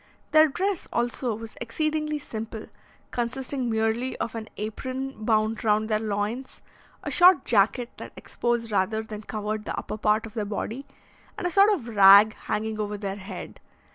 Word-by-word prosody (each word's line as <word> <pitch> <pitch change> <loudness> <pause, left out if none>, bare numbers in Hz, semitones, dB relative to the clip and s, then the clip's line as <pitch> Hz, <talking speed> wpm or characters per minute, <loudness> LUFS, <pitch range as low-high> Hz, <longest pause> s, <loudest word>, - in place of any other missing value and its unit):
Their 310 0 +7
dress, 380 +6 -2
also, 240 -1 -1
was 225 0 -9
exceedingly 305 +5 -1
simple, 225 -5 -7 0.5
consisting 255 +1 -2
merely 225 +3 0
of 230 - -3
an 225 -1 -6
apron 255 +5 -4
bound 220 0 +1
round 215 0 +2
their 215 -1 +2
loins, 215 +4 -3 0.4
a - - -4
short 355 -4 +6
jacket 230 +3 +2
that - - -8
exposed 235 -1 -2
rather 215 +3 +1
than 215 -1 -8
covered 215 0 -4
the - - -4
upper 215 - -5
part 215 +1 +2
of 220 - -10
their 220 -2 -2
body, 220 +6 -4 0.5
and - - -4
a 355 - 0
sort 400 +4 +6
of 310 - -1
rag 205 0 +7
hanging 215 0 -3
over 210 0 -2
their 200 -1 -4
head. 195 -1 -8
225 Hz, 165 wpm, -26 LUFS, 215-260 Hz, 0.5 s, Their